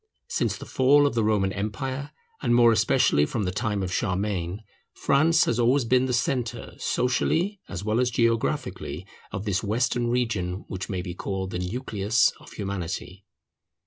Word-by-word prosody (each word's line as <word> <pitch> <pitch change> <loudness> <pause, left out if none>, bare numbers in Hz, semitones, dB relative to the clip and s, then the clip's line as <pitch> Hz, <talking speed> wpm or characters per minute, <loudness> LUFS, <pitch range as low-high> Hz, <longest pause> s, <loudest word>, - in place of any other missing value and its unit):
Since - - 0
the - - -9
fall 145 +3 +4
of 140 - +1
the 115 -1 +1
Roman 100 -3 +1
empire, 130 +8 -3 0.3
and 120 - +2
more 120 -1 +6
especially 105 -9 +3
from 105 +8 -1
the 90 - -1
time 105 +1 -1
of 90 -1 -3
Charlemagne, 95 -1 -2 0.3
France 160 +4 +3
has 120 - 0
always 125 +2 +3
been 125 +2 +3
the - - -1
centre, 120 -2 -1
socially 165 +10 0
as 100 0 -5
well 110 +2 +1
as 125 0 +2
geographically, 115 -1 -1 0.3
of 95 +3 -5
this 100 -3 0
Western 120 +3 0
region 110 -7 -1
which 95 -1 -5
may 95 -3 -2
be 90 -2 -5
called 95 +1 -4
the 90 - -3
nucleus 105 +2 +1
of - - -15
Humanity. 95 -1 -5
110 Hz, 165 wpm, -26 LUFS, 95-125 Hz, 0.3 s, more